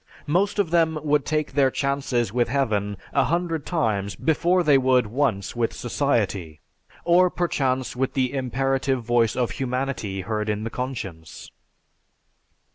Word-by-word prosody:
Most 190 +7 +1
of 195 -6 +1
them 165 -2 +2
would 150 -2 +2
take 155 -1 -1
their 135 -1 +4
chances 135 -5 -1
with 120 -1 +2
heaven 105 -6 0 0.2
a - - +3
hundred 165 +1 -1
times 105 - -1
before 175 - +2
they 150 -3 +5
would 130 -2 +3
once 110 -4 -1
with 115 -1 0
society, 105 - -1 0.5
or 180 +1 +5
perchance 135 -8 -1
with 130 +2 -1
the 130 -1 0
imperative 135 0 0
voice 120 -1 +2
of 120 -5 0
humanity 125 -5 -3
heard 105 +2 -2
in 105 0 -1
the 115 - -4
conscience." 105 -12 -6
130 Hz, 140 wpm, -24 LUFS, 115-145 Hz, 0.5 s, they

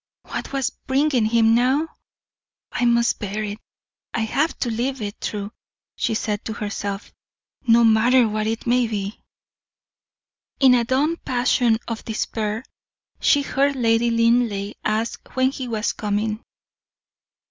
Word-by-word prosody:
What - - -6
was 270 -1 -1
bringing 265 -3 +1
him 225 0 +4
now? 260 +7 +2 0.8
"I 245 - 0
must 235 0 +3
bear 210 0 -3
it, 210 0 -5 0.6
I 230 - 0
have 280 +9 0
to 240 - 0
live 255 +4 -2
it 205 -1 -5
through," 205 -1 -4 0.4
she 225 - -1
said 210 -1 -2
to 220 - -3
herself, 205 -2 -5 0.5
"no 235 +1 +6
matter 230 +2 +5
what 215 0 -1
it 225 0 -3
may 245 0 +3
be." 205 -1 -4 1.4
In 265 -2 +6
a 240 -1 +4
dumb 285 +7 +1
passion 245 -3 +2
of 230 -1 -4
despair, 220 0 -3 0.6
she 285 -1 +3
heard 280 +1 +1
Lady 230 -1 +2
Linleigh 230 -3 +2
ask 220 +2 -2
when 260 0 +3
he 260 -2 -5
was 225 -2 -1
coming. 210 +1 -2
230 Hz, 135 wpm, -22 LUFS, 215-255 Hz, 1.4 s, no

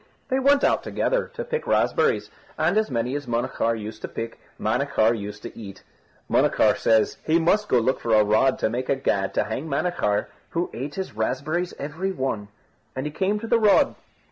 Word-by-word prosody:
They 260 - +2
went 280 +1 +4
out - - +3
together - - -1
to 485 - -3
pick 475 -1 -3
raspberries, - - +2 0.3
and 165 +5 +2
as 215 0 +2
many 125 0 -1
as 145 -2 -4
Munachar 115 -1 0
used 110 +1 -7
to - - -4
pick 115 0 -6 0.2
Manachar 115 0 +2
used 105 -1 -7
to - - -8
eat. 100 -4 -10 0.4
Munachar - - +3
said 110 -1 +2
he 160 +1 +3
must 200 +6 +2
go 125 - +4
look 125 +3 +1
for 115 -2 +2
a 105 - +6
rod 110 +6 +3
to - - +2
make 125 +2 -3
a - - +3
gad 100 -7 0
to - - +3
hang 120 +8 -4
Manachar, 140 -8 0 0.2
who 170 +1 -2
ate 140 +5 -5
his 190 - -5
raspberries 140 +10 -1
every 160 +7 -3
one; 130 - -3 0.5
and 130 +2 -3
he 150 - -3
came 195 +6 0
to 230 - -5
the 235 0 +3
rod. 210 -2 +4
135 Hz, 195 wpm, -24 LUFS, 110-180 Hz, 0.5 s, a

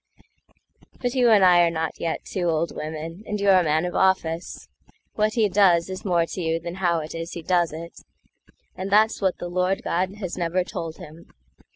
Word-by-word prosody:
But 245 -1 -2
you 250 -3 +3
and 205 -4 +6
I 180 -1 +6
are 170 - +4
not 160 -1 -3
yet 165 - -3
two 180 -3 -2
old 165 +1 -1
women, 160 +4 -6
And 210 - -3
you're 195 -2 +5
a - - +1
man 155 +1 +1
of 180 - -4
office. 180 -3 0 0.5
What 215 0 0
he 220 -2 +2
doesIs 185 -2 +2
more 175 -4 +2
to 180 - -6
you 165 0 0
than 170 +1 -6
how 170 -3 +2
it 155 - -8
is 165 0 -6
he 170 - -7
does 175 -1 +1
it,—And 170 +3 -11
that's 215 +2 +3
what 190 -2 +1
the 175 - -6
Lord 180 +2 -1
God 185 +3 -1
has 185 -4 -6
never 175 +1 0
told 165 -2 -6
him. 160 +3 -13
175 Hz, 195 wpm, -24 LUFS, 165-190 Hz, 0.5 s, and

